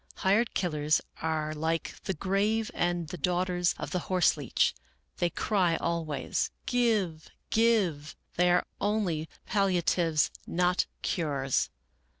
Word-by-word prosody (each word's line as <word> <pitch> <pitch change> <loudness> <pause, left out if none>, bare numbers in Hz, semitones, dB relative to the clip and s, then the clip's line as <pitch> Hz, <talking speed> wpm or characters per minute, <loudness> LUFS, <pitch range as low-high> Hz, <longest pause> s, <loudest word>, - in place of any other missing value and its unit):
Hired 210 +5 +2
killers 155 -4 +1 0.2
are 155 -1 -1
like 160 +2 -1
the 190 - -1
grave 205 +6 0
and 175 -2 -1
the 180 0 -6
daughters 180 +1 +1
of - - -5
the 180 - 0
horse 185 -2 +4
leech, 145 -5 +1 0.2
— - - -44
they 175 - +2
cry 180 -3 +1
always, 165 -3 -1
' - - -45
Give, 200 -10 +1 0.2
Give.' 200 -10 +2 0.2
They 180 +1 +3
are 175 0 +3 0.2
only 195 -7 0 0.2
palliatives, 175 -5 +2 0.2
not 180 +1 +1 0.2
cures. 140 -6 0
175 Hz, 130 wpm, -29 LUFS, 160-195 Hz, 0.2 s, horse